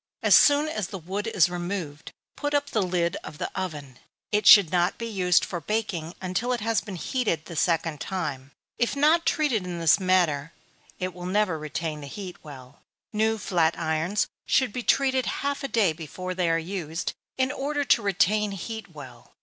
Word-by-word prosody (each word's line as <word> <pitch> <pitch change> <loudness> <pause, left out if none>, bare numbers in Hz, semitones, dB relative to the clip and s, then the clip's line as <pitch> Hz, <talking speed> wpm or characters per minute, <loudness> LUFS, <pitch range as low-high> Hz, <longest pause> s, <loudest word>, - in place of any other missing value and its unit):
As - - +6
soon 290 +1 +5
as 215 - -3
the 195 - -6
wood 190 +5 -4
is 200 -7 +4
removed, 175 -4 -5 0.2
put 290 0 -2
up 285 0 0
the 215 - +1
lid 175 -2 0
of 150 - -9
the - - -4
oven. 150 -9 -6 0.3
It 210 0 +1
should 195 -6 +9
not 180 +1 +1
be 230 - -5
used 185 -5 +2
for 175 -3 -5
baking 185 -4 -3
until 190 +7 -1
it 245 - -2
has 225 +1 0
been 200 - -7
heated 175 - -1
the 170 - -9
second 165 -2 0
time. 145 -8 -4 0.3
If 240 +3 +1
not 310 +4 +3
treated 290 - +1
in 180 -1 -5
this 165 +2 +4
manner, 170 -6 +1 0.4
it 185 0 -3
will 180 0 -7
never 190 -4 +1
retain 155 0 -4
the 140 - -8
heat 185 +3 -7
well. 135 -2 -12 0.3
New 220 +1 +1
flat 170 -5 +1
irons 160 +5 0 0.2
should 255 -5 +2
be 250 - -3
heated 265 +1 +2
half 280 0 -2
a - - -1
day 210 -10 +2
before 175 +3 -6
they 180 -2 0
are 165 - +3
used, 165 -1 -4 0.2
in 260 0 +1
order 290 +1 -2
to 235 - +4
retain 205 +1 +1
heat 200 -2 -7
well. 140 -4 -12
185 Hz, 190 wpm, -26 LUFS, 165-220 Hz, 0.4 s, should